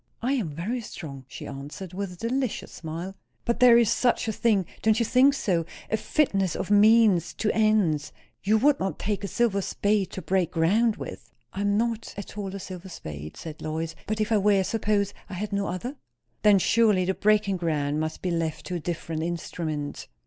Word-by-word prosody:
"I 260 Hz, +3 st, +1 dB
am 230 Hz, -, -1 dB
very 190 Hz, -, -3 dB
strong!" 140 Hz, -, -8 dB
she -, -, -9 dB
answered, 145 Hz, +7 st, -8 dB
with 195 Hz, 0 st, -4 dB
a -, -, -10 dB
delicious 255 Hz, -1 st, -2 dB
smile. 170 Hz, +4 st, -6 dB, 0.3 s
"But 235 Hz, 0 st, 0 dB
there 245 Hz, -1 st, +8 dB
is 235 Hz, -2 st, +4 dB
such 245 Hz, -2 st, +2 dB
a -, -, +1 dB
thing 205 Hz, -4 st, +2 dB, 0.2 s
don't 220 Hz, 0 st, +3 dB
you 235 Hz, -, +2 dB
think 260 Hz, +4 st, +5 dB
so? 180 Hz, -10 st, 0 dB, 0.3 s
as 220 Hz, -, 0 dB
fitness 195 Hz, -, +1 dB
of 195 Hz, -, -3 dB
means 210 Hz, -4 st, +5 dB
to 215 Hz, -, 0 dB
ends. 210 Hz, -9 st, +2 dB, 0.3 s
You 215 Hz, +3 st, +3 dB
would 280 Hz, +5 st, +3 dB
not 190 Hz, 0 st, -2 dB
take 205 Hz, -1 st, -2 dB
a -, -, -1 dB
silver 215 Hz, -3 st, +1 dB
spade 205 Hz, 0 st, 0 dB
to 190 Hz, -, -5 dB
break 185 Hz, -3 st, +1 dB
ground 210 Hz, +7 st, +3 dB
with?" 115 Hz, -, -8 dB, 0.2 s
"I 195 Hz, -, -3 dB
am 205 Hz, 0 st, +2 dB
not 230 Hz, 0 st, -2 dB
at 200 Hz, -, -7 dB
all 200 Hz, -2 st, -4 dB
a -, -, -5 dB
silver 185 Hz, 0 st, -8 dB
spade," 75 Hz, -, -8 dB
said 160 Hz, -2 st, -8 dB
Lois. 160 Hz, +1 st, -3 dB
"But 215 Hz, 0 st, -2 dB
if 215 Hz, +1 st, 0 dB
I 215 Hz, -, +4 dB
were; 200 Hz, -1 st, +3 dB
suppose 205 Hz, -1 st, 0 dB, 0.2 s
I 185 Hz, -, -6 dB
had 205 Hz, +2 st, -4 dB
no 200 Hz, 0 st, 0 dB
other?" 240 Hz, +11 st, -4 dB, 0.4 s
"Then 210 Hz, -2 st, +6 dB
surely 205 Hz, -1 st, +3 dB
the 190 Hz, -, +1 dB
breaking 205 Hz, -1 st, +2 dB
ground 150 Hz, -4 st, -1 dB
must 155 Hz, 0 st, -3 dB
be 180 Hz, -, 0 dB
left 165 Hz, -2 st, -2 dB
to 180 Hz, -, -5 dB
a 175 Hz, -, -1 dB
different 165 Hz, -1 st, -4 dB
instrument." 160 Hz, -3 st, -4 dB
195 Hz, 200 wpm, -26 LUFS, 170-215 Hz, 0.4 s, there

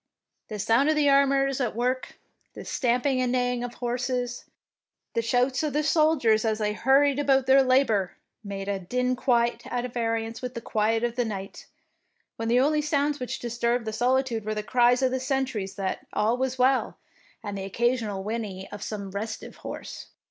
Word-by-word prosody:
The 215 Hz, -, -6 dB
sound 230 Hz, +8 st, +3 dB
of 310 Hz, -, +3 dB
the 295 Hz, -1 st, +3 dB
armourers 275 Hz, -1 st, +3 dB
at 240 Hz, -4 st, -1 dB
work, 250 Hz, +2 st, -2 dB, 0.4 s
the -, -, -8 dB
stamping 255 Hz, +1 st, +1 dB
and 250 Hz, -1 st, 0 dB
neighing 245 Hz, -1 st, 0 dB
of 245 Hz, 0 st, -6 dB
horses, 245 Hz, 0 st, -2 dB, 0.7 s
the 230 Hz, -, +1 dB
shouts 245 Hz, +3 st, +1 dB
of 305 Hz, -2 st, -2 dB
the 300 Hz, +1 st, +1 dB
soldiers 300 Hz, -9 st, +3 dB
as 220 Hz, -1 st, 0 dB
they 210 Hz, -1 st, -1 dB
hurried 275 Hz, +5 st, +3 dB
about 270 Hz, -2 st, +3 dB
their 270 Hz, +1 st, +6 dB
labour, 255 Hz, -8 st, +2 dB, 0.3 s
made 200 Hz, -1 st, -6 dB
a 200 Hz, -1 st, -1 dB
din 250 Hz, +7 st, -1 dB
quite 240 Hz, -2 st, +1 dB
at 245 Hz, 0 st, -3 dB
variance 225 Hz, -1 st, -2 dB
with 250 Hz, -1 st, -5 dB
the -, -, -3 dB
quiet 225 Hz, +1 st, 0 dB
of 240 Hz, 0 st, -1 dB
the 245 Hz, -, +2 dB
night, 195 Hz, -3 st, -6 dB, 0.7 s
when 225 Hz, -, -4 dB
the 240 Hz, +2 st, +4 dB
only 300 Hz, +3 st, +3 dB
sounds 295 Hz, -1 st, 0 dB
which 250 Hz, -, -4 dB
disturbed 235 Hz, 0 st, -1 dB
the 220 Hz, -, -3 dB
soli 255 Hz, +4 st, +2 dB
tude 230 Hz, -5 st, -4 dB
were 215 Hz, +1 st, -3 dB
the 210 Hz, -, -3 dB
cries 245 Hz, +2 st, +3 dB
of 260 Hz, -, +3 dB
the 260 Hz, -, -1 dB
sentries 260 Hz, -7 st, -2 dB
that 195 Hz, -2 st, -4 dB
all 215 Hz, +3 st, +2 dB
was 260 Hz, 0 st, -2 dB
well, 260 Hz, +1 st, +2 dB, 0.5 s
and 205 Hz, -1 st, -5 dB
the 195 Hz, -, -4 dB
occasional 220 Hz, -1 st, -1 dB
whinny 205 Hz, -3 st, -4 dB
of 205 Hz, -, -8 dB
some 200 Hz, -2 st, -5 dB
restive 215 Hz, +3 st, -6 dB
horse. -, -, -8 dB
245 Hz, 185 wpm, -26 LUFS, 220-260 Hz, 0.7 s, their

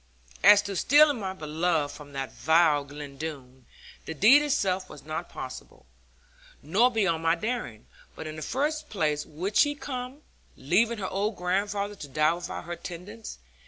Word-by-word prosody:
As 205 Hz, 0 st, +8 dB
to 200 Hz, -1 st, -5 dB
stealing 290 Hz, -, +5 dB
my 190 Hz, -2 st, -3 dB
beloved 160 Hz, -2 st, -1 dB
from 145 Hz, -1 st, -12 dB
that 135 Hz, -1 st, -4 dB
vile 160 Hz, -2 st, +3 dB
Glen 145 Hz, -1 st, -9 dB
Doone, 130 Hz, -5 st, -8 dB, 0.4 s
the 160 Hz, -, -5 dB
deed 240 Hz, -, +7 dB
itself 190 Hz, -11 st, 0 dB
was 145 Hz, -, -12 dB
not 155 Hz, +1 st, -4 dB
impossible, -, -, -9 dB, 0.8 s
nor 200 Hz, -, +3 dB
beyond 190 Hz, -9 st, 0 dB
my 165 Hz, 0 st, +3 dB
daring; 215 Hz, -, -4 dB, 0.3 s
but -, -, -7 dB
in 155 Hz, 0 st, -6 dB
the 155 Hz, -, -7 dB
first 300 Hz, -, -2 dB
place 150 Hz, -6 st, -1 dB
would 185 Hz, +7 st, -5 dB
she 290 Hz, 0 st, +4 dB
come, 265 Hz, 0 st, -6 dB, 0.3 s
leaving 215 Hz, -, +2 dB
her 190 Hz, -2 st, -3 dB
old 205 Hz, +2 st, -1 dB
grandfather 200 Hz, +3 st, -1 dB
to 150 Hz, -8 st, -9 dB
die 155 Hz, +3 st, +2 dB
without 175 Hz, 0 st, -6 dB
her 175 Hz, +1 st, -5 dB
tendence? 190 Hz, +7 st, -9 dB
180 Hz, 160 wpm, -27 LUFS, 155-220 Hz, 0.8 s, As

